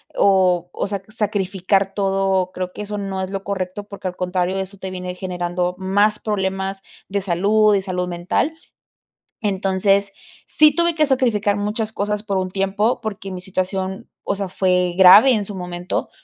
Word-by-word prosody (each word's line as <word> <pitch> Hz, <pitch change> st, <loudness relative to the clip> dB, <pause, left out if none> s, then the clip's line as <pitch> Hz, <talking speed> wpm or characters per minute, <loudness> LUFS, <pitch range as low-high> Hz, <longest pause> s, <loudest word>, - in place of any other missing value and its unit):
o 185 Hz, -3 st, +3 dB
o -, -, -2 dB
sea, 200 Hz, -1 st, -4 dB
sacrificar 195 Hz, -2 st, 0 dB
todo. 195 Hz, -2 st, 0 dB
Creo 185 Hz, -1 st, -4 dB
que -, -, -7 dB
eso 210 Hz, 0 st, -4 dB
no 195 Hz, -1 st, -3 dB
es 185 Hz, -, -3 dB
lo 195 Hz, 0 st, -4 dB
correcto, 190 Hz, 0 st, -3 dB
porque 200 Hz, -2 st, -6 dB
al 180 Hz, -, -10 dB
contrario 180 Hz, +1 st, -1 dB
eso 195 Hz, +1 st, -5 dB
te 190 Hz, 0 st, -6 dB
viene 180 Hz, -1 st, -5 dB
generando 180 Hz, -1 st, -2 dB
más 205 Hz, +3 st, +2 dB
problemas 195 Hz, -2 st, -2 dB, 0.3 s
de 200 Hz, 0 st, -2 dB
salud, 205 Hz, +4 st, +3 dB
de 195 Hz, -, +2 dB
salud 180 Hz, -2 st, -3 dB
mental. 175 Hz, -, -1 dB, 0.9 s
Entonces, 195 Hz, 0 st, +1 dB, 0.3 s
sí 305 Hz, -1 st, +5 dB
tuve 340 Hz, 0 st, +3 dB
que 310 Hz, -1 st, +3 dB
sacrificar 220 Hz, -6 st, +1 dB
muchas 215 Hz, +2 st, -2 dB
cosas 210 Hz, 0 st, -2 dB
por 200 Hz, -3 st, -1 dB
un 185 Hz, 0 st, -2 dB
tiempo, 200 Hz, +5 st, 0 dB
porque 200 Hz, -3 st, -5 dB
mi 185 Hz, -1 st, -6 dB
situación, 190 Hz, 0 st, -3 dB, 0.2 s
o 200 Hz, -, -1 dB
sea, 195 Hz, -1 st, -3 dB
fue 180 Hz, -1 st, +1 dB
grave 200 Hz, +8 st, +8 dB
en 215 Hz, -4 st, 0 dB
su 205 Hz, -, -7 dB
momento. 180 Hz, -1 st, -4 dB
195 Hz, 170 wpm, -20 LUFS, 185-205 Hz, 0.9 s, grave